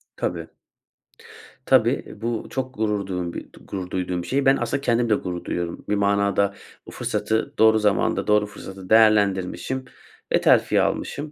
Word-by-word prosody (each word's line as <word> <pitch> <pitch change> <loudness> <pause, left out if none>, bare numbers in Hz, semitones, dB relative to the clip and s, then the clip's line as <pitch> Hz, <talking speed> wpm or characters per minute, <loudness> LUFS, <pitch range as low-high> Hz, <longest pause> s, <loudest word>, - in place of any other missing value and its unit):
Tabii. 85 -2 -3 1.2
Tabii, - - +2
bu 115 -1 -3
çok 130 -1 -4
gurur 105 -2 -1
duğum 90 -2 -3
bir - - -6
d - - -17
gurur 95 -2 -5
duyduğum 90 -1 -2
bir - - -9
şey. 135 +1 0
Ben, 135 +1 +5
aslında 120 +3 -2
kendim 120 -2 +1
de 105 - +4
gurur 90 -3 -5
duyuyorum. 85 -1 -4
Bir 105 - +2
manada, 100 0 +1 0.3
bu - - -9
fırsatı 110 0 -2
doğru 110 0 +5
zamanda, 105 -2 +1
doğru 105 0 +3
fırsatı 95 -2 -10
değerlendirmişim 110 +3 +2 0.5
ve - - +3
terfi - - +4
almışım. 150 +1 -2
105 Hz, 160 wpm, -23 LUFS, 95-115 Hz, 1.2 s, Ben